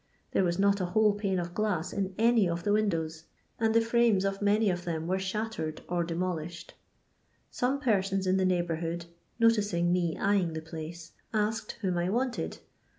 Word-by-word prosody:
There - - +2
was 175 -1 +1
not 200 0 +3
a - - +1
whole 215 +2 +3
pane 200 -2 -1
of 175 -1 -3
gloM 205 -4 0
in 195 -2 -2
any 225 -4 +4
of 170 0 -2
the 205 - +2
windows, 165 -7 0 0.3
and 225 -1 +2
the 230 - +6
frames 230 -4 +3
of 195 0 -2
many 205 0 +3
of 175 0 -3
them 165 -2 -3
were 185 +2 0
shattered 190 -5 -3
or 175 -1 0
de 165 0 -4
molished. 170 -1 -3 0.8
Some 260 +3 0
persons 195 -6 +1
in 185 +1 +2
the 190 - +2
neighbourhood, 170 -2 -1 0.3
noticing 205 -7 +3
me 175 -2 0
eyeing 195 -4 +1
the 160 - -3
place, 160 +1 -8 0.2
asked 210 0 0
whom 180 -2 +1
I 175 +1 0
wanted. 245 +4 -1
190 Hz, 180 wpm, -29 LUFS, 170-210 Hz, 0.8 s, the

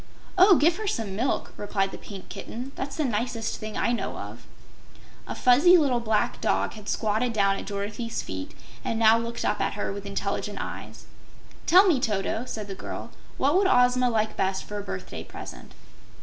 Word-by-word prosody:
"Oh, 380 +1 +8
give 330 +3 +3
her 435 - -4
some 220 - -2
milk," 245 +6 -1
replied 195 -1 -1
the - - -7
Pink 195 -2 -9
Kitten; 250 +4 -7
"that's 275 +1 -5
the 310 - 0
nicest 230 -1 -2
thing 215 -1 -5
I - - +1
know 240 - -2
of." - - -9 0.8
A - - -4
fuzzy 290 +9 +6
little 275 -7 +2
black 220 -2 0
dog - - +1
had 210 -2 -8
squatted 220 +2 0
down 195 -2 +2
at - - -7
Dorothy's 205 +3 -3
feet 95 0 -6 0.3
and 225 - -1
now 225 0 +6
looked 235 0 -4
up - - 0
at - - 0
her 205 - -3
with 200 0 -7
intelligent 200 0 -3
eyes. - - -7 0.6
"Tell 370 +4 +8
me, 335 -9 +4
Toto," 220 +1 -1
said 215 -4 -5
the 195 - -5
girl; 190 - -7 0.3
"what 285 +4 +2
would 385 +1 +4
Ozma 250 -1 +4
like 220 -2 0
best 190 0 0
for 210 0 -5
a - - -5
birthday 95 - -6
present?" - - -10
225 Hz, 190 wpm, -26 LUFS, 205-255 Hz, 0.8 s, Oh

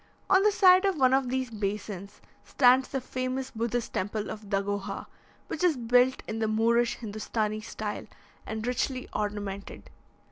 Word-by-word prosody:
On 380 0 +6
the 420 +1 +4
side 375 -2 +6
of 390 -4 +1
one 260 -2 +4
of 265 -2 +2
these 260 -1 -2
basins, 205 -1 -5 0.2
stands 255 0 +4
the 270 - -2
famous 255 +1 -3
Buddhist 235 0 -2
temple 205 +2 -2
of 210 -2 -9
Dagoha, 200 0 -2 0.4
which 320 - -4
is 340 -6 +3
built 245 +2 +3
in 220 +1 -3
the 220 - +1
Moorish 230 +2 +2
Hindostanee 215 -1 -3
style, 210 0 -5 0.4
and 220 0 -5
richly 255 +1 -1
ornamented. 205 -1 -4
230 Hz, 150 wpm, -28 LUFS, 210-260 Hz, 0.4 s, On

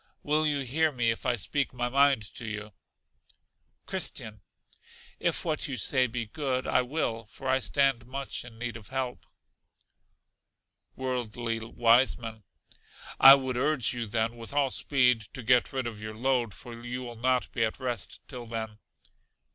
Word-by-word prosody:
Will 155 +1 +2
you 145 -2 0
hear 155 +5 +1
me 120 -4 +1
if 115 - -4
I 125 - +3
speak 140 +7 -1
my 120 0 0
mind 135 -2 +4
to 120 - -6
you? 105 -1 -6 1.1
Christian. 105 -2 -3 0.8
If - - -1
what 155 -1 0
you 135 -3 -4
say 130 +4 +3
be 120 0 -3
good, 130 +2 -2
I 130 - +3
will, 125 -4 -2
for 130 +5 -9
I 130 0 +3
stand 135 -3 +1
much 135 +2 -4
in 120 -2 -13
need 120 -1 -4
of 110 - -13
help. 130 -2 -4 1.7
Worldly 120 -3 -2
Wiseman. 115 -1 +2 0.8
I 135 +1 +11
would 130 -2 -2
urge 135 -4 +1
you 120 -2 -3
then, 115 +2 -1
with 115 +3 -8
all 140 -2 +2
speed, 125 -5 +3
to 130 - -6
get 125 +1 +4
rid 130 -2 -2
of 110 -3 -6
your 110 0 -6
load; 120 -3 0
for 120 - -9
you 125 +1 -4
will 120 -1 -7
not 125 +2 0
be 115 - 0
at 110 +3 -1
rest 120 -5 -3
till 125 -4 -8
then. 110 -1 -5
125 Hz, 165 wpm, -28 LUFS, 115-135 Hz, 1.7 s, I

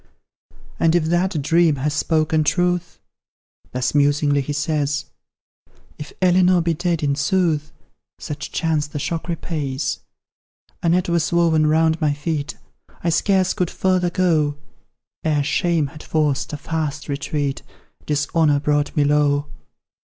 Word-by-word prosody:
"And 165 0 +3
if 175 - +3
that 175 0 +1
dream 165 +1 +3
has 145 +2 -2
spoken 155 +1 +1
truth," 180 +2 0 0.7
Thus 125 0 -1
musingly 145 0 +2
he 140 - -5
says; 145 -1 -1 0.9
"If 150 - -8
Elinor 180 0 +4
be 165 0 0
dead, 170 -1 -1
in 140 -1 +2
sooth, 155 -1 0 0.5
Such 150 0 -6
chance 155 -3 0
the 150 - -7
shock 165 +4 -3
repays: 155 -5 -3 0.8
A 170 - +1
net 180 +2 +2
was 170 -2 0
woven 165 -3 +3
round 160 +1 +2
my 150 -2 +2
feet, 145 0 -3 0.5
I 170 - +1
scarce 185 +2 +2
could 180 -2 -1
further 185 -2 +1
go; 160 -5 +1 0.7
Ere 150 -2 +1
shame 170 +1 +1
had 150 +2 -9
forced 145 -2 -1
a 150 - -4
fast 150 0 -3
retreat, 140 0 -2 0.5
Dishonour 150 0 +2
brought 145 0 0
me 145 - +4
low. 145 0 +2
155 Hz, 135 wpm, -21 LUFS, 145-170 Hz, 0.9 s, Elinor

